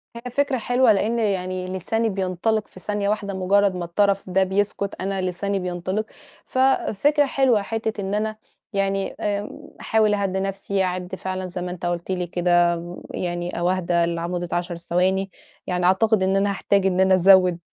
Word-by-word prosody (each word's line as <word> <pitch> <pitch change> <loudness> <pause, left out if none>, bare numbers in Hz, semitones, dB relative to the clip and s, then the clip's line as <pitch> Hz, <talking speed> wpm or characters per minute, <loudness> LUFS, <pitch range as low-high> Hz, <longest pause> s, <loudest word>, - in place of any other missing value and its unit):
هي 240 +1 -7
فكرة 280 +1 +1
حلوة، 245 +1 +3
لإن 215 +3 +1
يعني 185 -3 -1
لساني 220 +5 -1
بينطلق 195 +3 -1
في - - -14
ثانية 205 +2 -2
واحدة 205 -1 -2
مُجرّد 195 +1 +2
ما 180 -1 -3
الطرف 195 +2 +1
ده 190 +1 +3
بيسكت، 200 +1 -1
أنا 195 0 -2
لساني 195 +2 -2
بينطلق، 180 +3 -3 0.4
ففكرة 270 +2 +2
حلوة 260 -6 +2
حتّة 220 0 -3
إن 195 +1 -3
أنا 215 +1 -1 0.4
يعني 195 0 0
آمم، 205 0 -2 0.3
أحاول 215 -1 +2
أهدّي 195 -2 0
نَفْسي 195 0 -1
أعد 180 0 -3
فعلًا 185 0 -4
زَيّ 180 0 -5
ما 180 - -4
أنت 180 -1 -6
قُلت 175 +1 -2
لي 180 -1 -2
كده 175 0 +2
م 175 +1 -8
يعني 175 0 -3
أو 175 +1 +1
أهدى 175 -2 +1
لع 170 0 -2
مدّة 175 0 -3
10 175 0 -2
ثواني 185 +3 0 0.4
يعني 180 -1 0
أعتقد 190 +2 +3
إن 190 +1 +2
أنا 200 +1 +2
هاحتاج 200 0 +1
إن 185 -1 +1
أنا 190 0 +5
أزوّد 185 -1 +5
190 Hz, 175 wpm, -23 LUFS, 180-205 Hz, 0.4 s, أنا